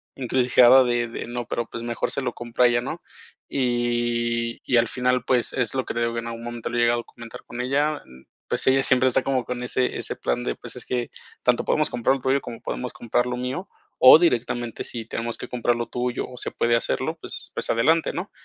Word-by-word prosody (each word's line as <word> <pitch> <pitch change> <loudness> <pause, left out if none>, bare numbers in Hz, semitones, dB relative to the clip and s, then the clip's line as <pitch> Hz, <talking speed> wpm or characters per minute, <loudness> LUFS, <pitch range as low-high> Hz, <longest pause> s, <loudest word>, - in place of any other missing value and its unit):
encrucijada 125 0 +5
de 120 -1 0
de 115 - -6
no, 120 0 -4
pero, 120 -1 -2
pues, 115 - -7
mejor 120 0 -2
se - - -2
lo 125 -2 -2
compro 120 +1 -1
a - - +8
ella, 120 0 +2
¿no? 155 +7 -6 0.5
Y 120 -2 0
y 125 - +3
al 115 - +4
final, 125 -1 0
pues, 125 -2 +1
es 125 -1 -1
lo 130 - -1
que - - -4
digo 115 0 -1
que 115 - -2
en 115 - -7
algún 115 0 -6
momento 120 -1 -5
lo 120 - -3
he - - +2
llegado 120 0 +3
a - - -17
comentar 115 0 -11
con 120 - -6
ella, 145 +4 0
mm, 65 +1 -17 0.2
pues, - - 0
ella 135 0 +4
siempre 130 0 +6
está 130 - +2
como 130 -3 0
con 125 0 -4
ese 125 +1 0
ese - - -3
plan - - -2
de - - -2
pues, - - -9
es - - -8
que 120 -2 -2 0.3
tanto 125 -1 +2
podemos 155 - +1
comprar 125 +2 +1
lo 135 - -7
tuyo, 135 +2 +1
como 115 -1 -9
podemos - - -5
comprar 120 +1 -1
lo 125 0 -3
mío, 130 +10 -4 0.3
o 130 +4 +10
directamente 120 -7 0
si 115 -2 -6
tenemos 115 +1 -4
que - - -7
comprar 120 -1 0
lo 120 -1 -3
tuyo 125 +1 -3
o 125 - -11
se - - -4
puede 120 0 +1
hacerlo, 115 - -1
pues - - -7
pues - - -4
adelante, 155 +8 +2
¿no?, 180 +4 -5
120 Hz, 240 wpm, -24 LUFS, 120-130 Hz, 0.5 s, o